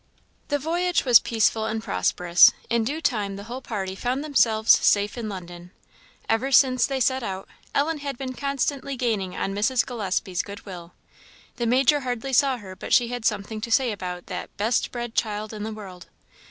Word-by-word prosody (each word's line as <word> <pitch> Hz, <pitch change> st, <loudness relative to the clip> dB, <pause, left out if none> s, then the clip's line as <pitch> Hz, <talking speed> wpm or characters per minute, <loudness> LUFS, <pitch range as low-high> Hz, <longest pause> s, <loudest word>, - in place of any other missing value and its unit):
The 290 Hz, -, 0 dB
voyage 340 Hz, +4 st, 0 dB
was 245 Hz, -3 st, +8 dB
peaceful 220 Hz, -1 st, +1 dB
and 220 Hz, 0 st, -3 dB
prosperous; 180 Hz, -4 st, +4 dB, 0.2 s
in 235 Hz, -1 st, +2 dB
due 290 Hz, +8 st, -3 dB
time 210 Hz, -9 st, -1 dB
the 200 Hz, -, -8 dB
whole 245 Hz, +4 st, -7 dB
party 195 Hz, -6 st, -4 dB
found 250 Hz, +7 st, -2 dB
themselves 225 Hz, -7 st, +3 dB
safe 205 Hz, 0 st, +3 dB
in 230 Hz, -3 st, -4 dB
London. 175 Hz, -2 st, -9 dB, 0.6 s
Ever 245 Hz, +5 st, 0 dB
since 255 Hz, -2 st, +5 dB
they 270 Hz, -1 st, -2 dB
set 260 Hz, +1 st, +1 dB
out, 195 Hz, -4 st, -5 dB, 0.3 s
Ellen 300 Hz, +2 st, +1 dB
had 280 Hz, -2 st, -5 dB
been 260 Hz, -1 st, -5 dB
constantly 275 Hz, 0 st, -2 dB
gaining 215 Hz, -7 st, -1 dB
on 195 Hz, -, -2 dB
Mrs. 235 Hz, +5 st, +1 dB
Gillespie's 190 Hz, -6 st, -2 dB
good 205 Hz, +2 st, -10 dB
will; 180 Hz, -3 st, -9 dB, 0.6 s
the 240 Hz, -1 st, -1 dB
Major 265 Hz, +4 st, +4 dB
hardly 255 Hz, 0 st, -4 dB
saw 270 Hz, -1 st, +3 dB
her 190 Hz, -4 st, -10 dB
but -, -, -4 dB
she 240 Hz, -2 st, +4 dB
had 245 Hz, -2 st, -5 dB
something 215 Hz, 0 st, -1 dB
to 235 Hz, -, -4 dB
say 250 Hz, 0 st, +3 dB
about 180 Hz, -3 st, -6 dB
that 180 Hz, -, -6 dB
"best 220 Hz, +3 st, 0 dB
bred 240 Hz, -2 st, -5 dB
child 215 Hz, -1 st, -2 dB
in 210 Hz, -, -7 dB
the 220 Hz, +1 st, -4 dB
world." 190 Hz, -5 st, -10 dB
230 Hz, 185 wpm, -24 LUFS, 200-260 Hz, 0.6 s, was